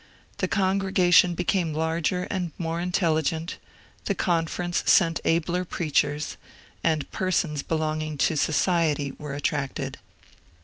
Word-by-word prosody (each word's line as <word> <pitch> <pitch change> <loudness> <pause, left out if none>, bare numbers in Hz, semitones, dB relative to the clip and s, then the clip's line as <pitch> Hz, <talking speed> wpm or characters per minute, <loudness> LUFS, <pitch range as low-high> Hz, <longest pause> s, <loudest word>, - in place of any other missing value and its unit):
The - - +1
congregation 190 -3 +3
became 175 -2 0
larger 160 +3 0
and 180 -4 -2
more 165 0 -2
intelligent; 165 -2 0 0.5
the - - 0
Conference 175 0 0
sent 165 -3 +4
abler 170 +2 +1
preachers; 150 -4 -1 0.5
and 155 -3 0
persons 170 -5 0
belonging 155 -1 -2
to 160 - +2
^ - - -4
society 155 -3 +1
' - - -35
were 150 -2 -5
attracted. 145 -1 -2
165 Hz, 120 wpm, -25 LUFS, 155-180 Hz, 0.5 s, sent